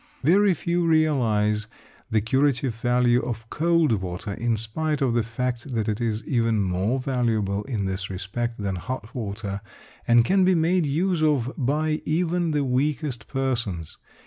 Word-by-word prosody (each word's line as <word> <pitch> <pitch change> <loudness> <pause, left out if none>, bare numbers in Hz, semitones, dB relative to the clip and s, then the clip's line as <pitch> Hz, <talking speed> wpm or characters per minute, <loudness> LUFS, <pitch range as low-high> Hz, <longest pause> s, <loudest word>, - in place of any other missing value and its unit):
Very 195 +2 +4
few 175 +1 -1
realise 115 -10 +2 0.4
the 110 -1 +2
curative 130 +2 +1
value 120 +1 +2
of 115 -2 -5
cold 170 -2 +2
water, 95 +3 -4
in 115 +1 0
spite 150 +8 -1
of 130 -4 +1
the 120 - +2
fact 120 +3 -3
that 110 -2 0
it 110 +1 -1
is 110 -2 -1
even 115 -4 +1
more 95 +6 0
valuable 115 -6 0
in 110 -7 -2
this 95 +1 -3
respect 100 +5 -4
than 100 -3 -2
hot 120 +2 -6
water, 100 -4 -4 0.5
and 120 -1 +5
can 190 +4 +3
be 185 0 +4
made 170 0 +2
use 170 +4 0
of 145 -5 +1
by 155 +4 0
even 175 +2 0
the 150 -2 +1
weakest 130 -2 -1
persons. 115 - -2
120 Hz, 155 wpm, -24 LUFS, 110-150 Hz, 0.5 s, and